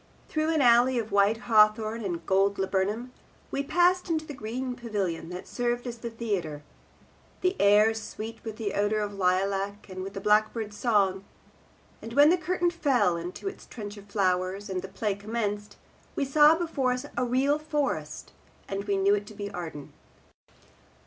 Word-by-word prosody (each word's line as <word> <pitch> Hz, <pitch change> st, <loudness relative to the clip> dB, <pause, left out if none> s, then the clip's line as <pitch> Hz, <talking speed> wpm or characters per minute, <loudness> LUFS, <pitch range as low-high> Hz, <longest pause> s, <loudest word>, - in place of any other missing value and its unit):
Through 310 Hz, 0 st, 0 dB
an 310 Hz, -3 st, +2 dB
alley 245 Hz, +1 st, +5 dB
of 225 Hz, -2 st, -3 dB
white 205 Hz, +3 st, +3 dB
hawthorn 215 Hz, 0 st, +3 dB
and 175 Hz, -4 st, -4 dB
gold 195 Hz, +1 st, +2 dB
laburnum 195 Hz, +6 st, -1 dB, 0.4 s
we 275 Hz, -, -1 dB
passed 355 Hz, +5 st, +2 dB
into 315 Hz, -1 st, 0 dB
the 295 Hz, -, -7 dB
green 250 Hz, +1 st, -4 dB
pavilion 200 Hz, -9 st, -3 dB
that 180 Hz, +1 st, -7 dB
served 240 Hz, 0 st, -2 dB
as 235 Hz, -1 st, -6 dB
the 235 Hz, -, -5 dB
theatre, 195 Hz, -10 st, -3 dB, 0.8 s
the 365 Hz, +1 st, +1 dB
air 210 Hz, +2 st, +5 dB
sweet 225 Hz, 0 st, -7 dB
with 220 Hz, 0 st, -7 dB
odour 205 Hz, 0 st, 0 dB
of 205 Hz, -1 st, -2 dB
the 200 Hz, -, -10 dB
lilac 195 Hz, +2 st, 0 dB
and 185 Hz, 0 st, -6 dB
with 195 Hz, +1 st, -7 dB
the -, -, -3 dB
blackbird's 210 Hz, +1 st, +1 dB
song; 200 Hz, -5 st, +1 dB, 0.8 s
and 230 Hz, -, -8 dB
when 290 Hz, +4 st, +7 dB
the -, -, +5 dB
curtain 350 Hz, +1 st, 0 dB
fell 255 Hz, -, +2 dB
into 175 Hz, -, -6 dB
its 390 Hz, -, -7 dB
trench 205 Hz, -2 st, -7 dB
of 205 Hz, -1 st, -13 dB
flowers, 190 Hz, 0 st, 0 dB
and 185 Hz, -1 st, -2 dB
the 190 Hz, -, -7 dB
play 200 Hz, +2 st, -2 dB
commenced, 205 Hz, 0 st, -4 dB, 0.4 s
we 280 Hz, -, 0 dB
saw 300 Hz, +3 st, +6 dB
before 320 Hz, -7 st, 0 dB
us 250 Hz, +2 st, -4 dB
a 250 Hz, -, 0 dB
real 265 Hz, +4 st, +2 dB
forest, 280 Hz, -, -3 dB, 0.4 s
and 195 Hz, +1 st, -4 dB
we 200 Hz, -1 st, 0 dB
knew 195 Hz, +1 st, +4 dB
it 205 Hz, 0 st, -1 dB
to 215 Hz, -, -11 dB
be 200 Hz, 0 st, -5 dB
Arden. 165 Hz, -6 st, -7 dB
215 Hz, 175 wpm, -27 LUFS, 195-250 Hz, 0.8 s, when